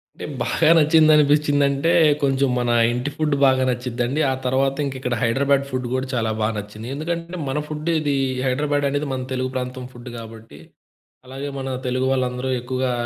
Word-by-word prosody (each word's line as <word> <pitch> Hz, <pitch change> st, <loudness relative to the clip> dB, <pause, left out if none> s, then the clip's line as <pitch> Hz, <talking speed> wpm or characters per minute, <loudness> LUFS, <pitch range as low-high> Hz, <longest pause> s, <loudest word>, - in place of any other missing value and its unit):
అంటే -, -, -7 dB, 0.2 s
బాగా 160 Hz, -1 st, +2 dB
నచ్చిందనిపిచ్చిందంటే 150 Hz, -1 st, +4 dB, 0.3 s
కొంచెం 135 Hz, 0 st, +2 dB
మన 120 Hz, -1 st, 0 dB, 0.2 s
ఇంటి 125 Hz, +4 st, -2 dB
ఫుడ్ 155 Hz, -2 st, +1 dB
బాగా 130 Hz, -1 st, +4 dB
నచ్చిద్దండి. 125 Hz, +3 st, -2 dB
ఆ -, -, +1 dB
తర్వాత 135 Hz, +2 st, +1 dB
ఇంకిక్కడ 130 Hz, -2 st, -3 dB
'హైడ్రాబ్యాడ్' 140 Hz, +3 st, +2 dB
ఫుడ్ 130 Hz, -1 st, -3 dB
గూడా 130 Hz, +1 st, -1 dB
చాలా 115 Hz, -3 st, 0 dB
బాగా 110 Hz, +1 st, +1 dB
నచ్చింది. 105 Hz, +2 st, -7 dB
ఎందుకంటే 170 Hz, +3 st, -4 dB
మన 140 Hz, +3 st, -1 dB
ఫుడ్ 155 Hz, +2 st, -4 dB
ఇది 145 Hz, -2 st, 0 dB, 0.3 s
'హైడ్రాబ్యాడ్' 145 Hz, +2 st, 0 dB
అనేది 145 Hz, +1 st, -2 dB
మన 130 Hz, -1 st, -3 dB
తెలుగు 130 Hz, 0 st, -1 dB
ప్రాంతం 125 Hz, 0 st, -4 dB
ఫుడ్ 120 Hz, +1 st, -10 dB
గాబట్టి, 110 Hz, -8 st, -11 dB, 0.7 s
అలాగే 135 Hz, +2 st, -6 dB
మన 135 Hz, -, -5 dB, 0.2 s
తెలుగు 130 Hz, +1 st, 0 dB
వాళ్ళందరూ 130 Hz, 0 st, -1 dB
ఎక్కువగా 130 Hz, +1 st, -2 dB
130 Hz, 155 wpm, -22 LUFS, 125-145 Hz, 0.7 s, నచ్చిందనిపిచ్చిందంటే